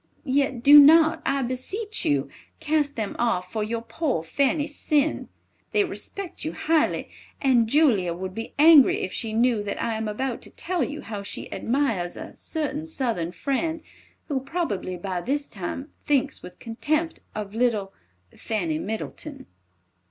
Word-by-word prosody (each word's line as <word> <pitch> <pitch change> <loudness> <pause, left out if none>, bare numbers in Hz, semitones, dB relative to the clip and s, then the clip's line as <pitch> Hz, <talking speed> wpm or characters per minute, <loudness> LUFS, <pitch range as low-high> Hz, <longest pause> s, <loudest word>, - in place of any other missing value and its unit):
Yet 265 -3 0
do 295 +1 +10
not, 315 +2 +7
I 275 -1 +1
beseech 390 - -3
you, 140 -1 +1 0.3
cast 300 -2 0
them 215 -3 -3
off 185 -6 0
for 215 -1 -1
your 230 +2 -3
poor 275 - -2
Fanny's 285 - 0
sin. 300 0 +1 0.4
They 415 - +4
respect 385 0 -6
you 310 - -3
highly, 320 -1 +1 0.3
and 250 -5 +3
Julia 220 - +3
would 185 +1 -5
be 225 +2 -7
angry 300 -2 +7
if 185 - -3
she 225 -3 -3
knew 230 0 +2
that 205 -1 -4
I 230 - -1
am 220 0 -3
about 240 +4 -3
to - - -9
tell 360 -1 -2
you 300 +1 -4
how 210 -2 -6
she 200 - -7
admires 230 -9 -1
a - - -9
certain 305 -1 -4
Southern 230 - -2
friend, 300 - -2 0.4
who 280 -4 0
probably, 265 - -3
by 180 0 -3
this 285 +7 -1
time, 235 - -6
thinks 280 -1 +1
with 180 - -11
contempt 310 +8 -2 0.2
of 210 -1 -5
little 220 -4 0 0.4
"FANNY 170 -8 -2
MIDDLETON." 265 - -5
260 Hz, 155 wpm, -25 LUFS, 210-300 Hz, 0.4 s, do